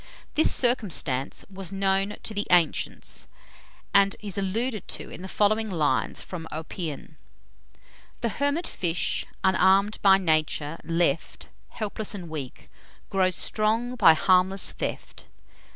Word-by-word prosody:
This 315 Hz, -, +4 dB
circumstance 180 Hz, -, +1 dB
was 195 Hz, -2 st, -2 dB
known 195 Hz, +1 st, 0 dB
to 220 Hz, -, -3 dB
the 205 Hz, 0 st, -2 dB
ancients, 160 Hz, -, +1 dB, 0.7 s
and 200 Hz, 0 st, +5 dB
is 205 Hz, -3 st, -5 dB
alluded 215 Hz, +3 st, -2 dB
to -, -, -4 dB
in -, -, -9 dB
the 190 Hz, -, -6 dB
following 215 Hz, +3 st, +1 dB
lines 150 Hz, -8 st, 0 dB
from 165 Hz, -3 st, -7 dB
Oppian: 160 Hz, -1 st, -6 dB, 1.0 s
The 235 Hz, -, 0 dB
hermit 285 Hz, -, -1 dB
fish, 175 Hz, -1 st, -1 dB, 0.2 s
unarm'd 190 Hz, +2 st, +3 dB
by 195 Hz, -2 st, +6 dB
Nature, 155 Hz, -3 st, 0 dB
left 165 Hz, +2 st, -1 dB, 0.2 s
Helpless 215 Hz, -1 st, -3 dB
and 175 Hz, -4 st, -7 dB
weak, 145 Hz, -5 st, -7 dB, 0.4 s
grow 190 Hz, -1 st, +3 dB
strong 220 Hz, +6 st, 0 dB
by 165 Hz, -9 st, +6 dB
harmless 185 Hz, +1 st, +3 dB
theft. -, -, -6 dB
190 Hz, 120 wpm, -26 LUFS, 165-210 Hz, 1.0 s, by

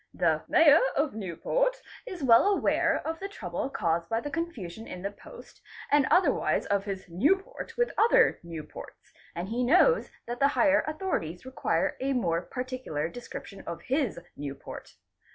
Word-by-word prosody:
The -, -, +2 dB
Mayor -, -, +7 dB, 0.2 s
of 285 Hz, 0 st, +1 dB
Newport 360 Hz, -, -1 dB, 0.3 s
is 365 Hz, -, -6 dB
well 235 Hz, +6 st, +6 dB
aware 405 Hz, -1 st, +2 dB
of 325 Hz, 0 st, -3 dB
the 395 Hz, -, -5 dB
trouble 185 Hz, -, -4 dB
caused 170 Hz, -8 st, -1 dB
by 225 Hz, -, +1 dB
the 290 Hz, +5 st, -6 dB
confusion 230 Hz, -, -5 dB
in 180 Hz, 0 st, -8 dB
the 200 Hz, -, -2 dB
post -, -, -14 dB, 0.3 s
and 290 Hz, -2 st, +4 dB
otherwise 370 Hz, -, +2 dB
of 200 Hz, -1 st, 0 dB
his 195 Hz, -2 st, -5 dB
Newport 375 Hz, -, -1 dB
with 485 Hz, 0 st, +1 dB
other 455 Hz, -, +5 dB
Newports, 165 Hz, -3 st, -10 dB, 0.2 s
and 175 Hz, +3 st, -4 dB
he 240 Hz, +3 st, -1 dB
knows 370 Hz, -, +4 dB, 0.2 s
that 240 Hz, +1 st, -5 dB
the 275 Hz, -, +5 dB
higher 295 Hz, -1 st, +4 dB
authorities 305 Hz, -, -3 dB
require 260 Hz, 0 st, -1 dB
a 270 Hz, +1 st, 0 dB
more 170 Hz, -9 st, 0 dB
particular 250 Hz, -, -4 dB
description 200 Hz, -3 st, -9 dB
of 170 Hz, -, -6 dB
his 270 Hz, -, 0 dB, 0.2 s
Newport. 140 Hz, -1 st, -8 dB
245 Hz, 155 wpm, -28 LUFS, -, 0.3 s, Mayor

